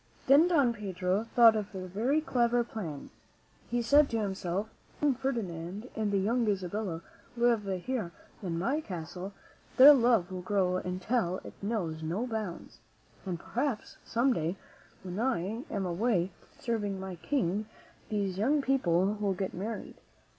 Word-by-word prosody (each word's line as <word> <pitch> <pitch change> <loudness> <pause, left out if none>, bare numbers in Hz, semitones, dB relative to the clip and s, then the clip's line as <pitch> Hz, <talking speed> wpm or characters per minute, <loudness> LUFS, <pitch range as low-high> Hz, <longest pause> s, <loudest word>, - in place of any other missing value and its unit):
Then 285 +6 +7
Don 285 -9 +3
Pedro 190 -1 -1
thought 230 -2 +8
of 210 -2 -4
a 185 -1 -4
very 235 - +1
clever 240 -5 +2
plan. 175 -11 -6 0.6
He 240 0 0
said 285 +5 +5
to 225 - -1
himself, 195 -1 -2 0.3
"If - - -26
the - - +2
young 285 - +4
Fer 265 +2 -1
dinand 190 0 -5
and 215 -2 0
the 200 - +2
young 225 +4 +1
Isabella 190 -3 -2 0.3
live 235 -3 +3 0.2
here 240 -9 -2 0.3
in 175 -4 -3
my 270 - 0
castle, 180 - -6 0.5
their 280 +3 +11
love 230 -8 +3
will 185 -1 -4
grow 185 -1 +1
until 185 +1 -1
it - - -9
knows 190 -7 -2
no 175 +9 -2
bounds; 215 -7 -5 0.5
and 175 -2 -2
perhaps 245 +3 -3
some 245 +3 +2
day 165 0 -1 0.5
when 185 +1 -5
I 230 - -1
am 200 -3 -2
away 185 0 +1 0.3
serving 205 -5 -2
my 190 -2 -6
King, 210 - -1 0.4
these 200 -3 -1
young 280 +7 +2
people 190 -11 +2
will 200 -2 0
get 190 +1 -3
married. 210 +5 -5
210 Hz, 155 wpm, -30 LUFS, 185-240 Hz, 0.6 s, their